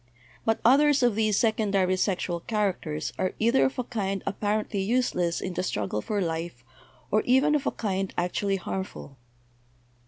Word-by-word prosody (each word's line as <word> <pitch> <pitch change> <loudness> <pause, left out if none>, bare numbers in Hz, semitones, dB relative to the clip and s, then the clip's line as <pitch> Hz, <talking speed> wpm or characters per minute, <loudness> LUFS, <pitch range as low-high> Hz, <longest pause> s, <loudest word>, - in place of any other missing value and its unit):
But 225 0 +2
others 280 +2 +5
of 240 -2 +4
these 215 -1 +1
secondary 200 -4 +2
sexual 180 -2 -1
characters 180 -6 -2
are 185 - 0
either 235 +4 +3
of 265 - -2
a 250 - 0
kind 195 -5 -3
apparently 210 +1 -1
useless 190 -6 0
in 185 - -4
the - - -1
struggle 105 - -2
for 205 - -2
life, 165 -7 -4 0.5
or 215 - +3
even 265 +4 +3
of 295 -2 0
a - - +2
kind 195 -3 -2
actually 195 +3 0
harmful. 190 -8 -6
200 Hz, 155 wpm, -27 LUFS, 180-225 Hz, 0.5 s, others